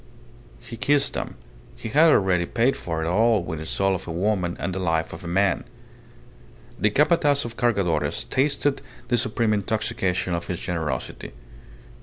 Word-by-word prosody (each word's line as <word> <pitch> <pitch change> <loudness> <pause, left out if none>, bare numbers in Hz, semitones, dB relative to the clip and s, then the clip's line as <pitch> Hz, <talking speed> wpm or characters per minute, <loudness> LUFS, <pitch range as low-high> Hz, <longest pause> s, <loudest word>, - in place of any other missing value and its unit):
He 115 - -9
kissed 140 +4 +2
them.... - - -4 0.4
He - - -7
had 155 +7 +5
already 90 -7 +2
paid 120 +3 +2
for 80 -2 -3
it - - -2
all 110 +2 +3
with 80 -3 -5
the 80 - -7
soul 95 +2 +1
of 95 - -5
a - - -4
woman 90 0 -1
and 95 - -2
the 95 - -3
life 80 -3 0
of 85 - -9
a - - -6
man.... 95 +3 +1 1.2
The 105 - +3
Capataz 145 - +3
de 120 - -4
Cargadores 100 -9 0
tasted 140 +1 +1 0.3
the 120 - +3
supreme 115 -1 +1
intoxication 100 -3 -1
of 85 0 -3
his 90 -2 -3
generosity. 80 -8 -4
100 Hz, 165 wpm, -24 LUFS, 85-120 Hz, 1.2 s, had